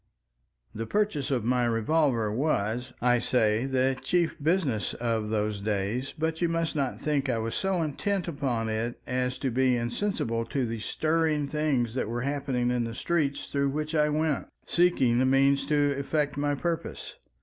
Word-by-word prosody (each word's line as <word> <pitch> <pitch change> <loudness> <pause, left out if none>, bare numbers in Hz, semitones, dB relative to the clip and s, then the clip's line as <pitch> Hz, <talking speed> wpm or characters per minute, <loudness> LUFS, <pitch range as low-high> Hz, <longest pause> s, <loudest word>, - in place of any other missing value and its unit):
The 115 +1 -4
purchase 205 -10 0
of 125 -5 0
my 125 0 +2
revolver 115 -1 +1
was, 120 -1 -1
I 125 -1 +4
say, 115 0 +2
the 130 0 +2
chief 175 -2 +1
business 150 - +1
of 115 -3 -1
those 105 -1 -1
days, 105 +5 -1
but 160 +1 -1
you 170 - +2
must 165 -1 -1
not 140 -4 -1
think 145 -3 0
I 120 - +1
was 115 0 -2
so 190 -3 0
intent 185 +5 -1
upon 130 -8 -1
it 110 +2 -2
as 125 0 -1
to 130 0 -2
be 130 0 +3
insensible 120 - -1
to 130 +2 -1
the 115 -1 -4
stirring 155 +4 0
things 140 -6 0
that 125 -4 -2
were 120 +1 -2
happening 135 -3 -1
in 125 -1 +1
the 115 0 -5
streets 150 -3 -1
through 140 -1 +1
which 150 +3 -3
I 150 -1 +3
went 155 -1 0 0.2
seeking 135 -9 +3
the 130 - +3
means 135 +1 +3
to 145 -1 +3
effect 145 +1 -1
my 145 0 0
purpose. 165 +3 -4
135 Hz, 170 wpm, -28 LUFS, 120-155 Hz, 0.2 s, I